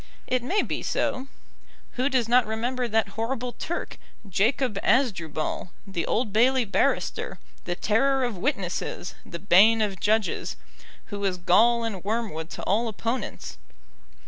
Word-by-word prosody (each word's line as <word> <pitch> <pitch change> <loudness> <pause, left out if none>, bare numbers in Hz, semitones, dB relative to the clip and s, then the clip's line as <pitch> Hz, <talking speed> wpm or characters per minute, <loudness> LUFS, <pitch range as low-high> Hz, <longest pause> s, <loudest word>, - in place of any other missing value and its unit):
It 255 0 0
may 375 - +1
be - - -3
so. 260 +1 -1 0.6
Who 255 +3 0
does 255 -5 +1
not 245 -1 +4
remember 240 +3 -1
that 220 -2 +1
horrible 235 +4 -3
Turk, 345 - -5 0.3
Jacob 210 +3 +1
Asdrubal, 185 - 0 0.2
the 185 -5 -3
Old 220 -3 0
Bailey 250 +3 +4
barrister, 200 - 0 0.3
the 175 - -2
terror 265 +8 +2
of 240 -4 -1
witnesses, 190 - -2
the 170 - -7
bane 200 +5 +6
of 200 -4 -1
judges, 215 +2 0 0.6
who 200 - -3
was 195 -2 0
gall 230 +7 +4
and 205 -6 -4
wormwood 205 -7 -2
to - - -7
all 225 +5 +1
opponents. 230 +3 -4
225 Hz, 140 wpm, -26 LUFS, 195-250 Hz, 0.6 s, bane